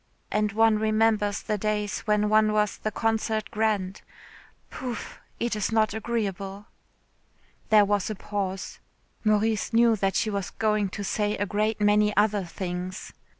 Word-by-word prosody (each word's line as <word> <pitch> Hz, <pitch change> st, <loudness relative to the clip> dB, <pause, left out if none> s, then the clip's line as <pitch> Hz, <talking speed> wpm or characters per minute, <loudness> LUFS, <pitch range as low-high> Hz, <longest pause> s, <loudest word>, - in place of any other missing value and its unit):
And 210 Hz, 0 st, +1 dB
one 220 Hz, 0 st, +4 dB
remembers 215 Hz, -1 st, +1 dB
the 210 Hz, -2 st, -2 dB
days 210 Hz, -1 st, -1 dB
when 210 Hz, 0 st, +2 dB
one 215 Hz, 0 st, +4 dB
was 210 Hz, -1 st, +1 dB
the 215 Hz, -, -2 dB
concert 220 Hz, 0 st, -1 dB
grand. 210 Hz, -3 st, -1 dB, 0.7 s
Pouf. 250 Hz, -3 st, -6 dB, 0.2 s
It 235 Hz, -1 st, -1 dB
is 210 Hz, 0 st, -1 dB
not 220 Hz, -2 st, +2 dB
agreeable." 205 Hz, -3 st, -3 dB, 1.0 s
There 210 Hz, -1 st, +6 dB
was 205 Hz, 0 st, 0 dB
a 215 Hz, -, -3 dB
pause. 195 Hz, -1 st, -4 dB, 0.4 s
Maurice 215 Hz, +1 st, +1 dB
knew 230 Hz, 0 st, +5 dB
that 195 Hz, -1 st, 0 dB
she 215 Hz, -, +1 dB
was 200 Hz, -2 st, -3 dB
going 215 Hz, -2 st, 0 dB
to 205 Hz, +2 st, -6 dB
say 210 Hz, +1 st, -1 dB
a 205 Hz, -, 0 dB
great 215 Hz, +2 st, -1 dB
many 210 Hz, 0 st, +3 dB
other 205 Hz, -1 st, +3 dB
things. 180 Hz, +1 st, -5 dB
210 Hz, 150 wpm, -26 LUFS, 205-220 Hz, 1.0 s, There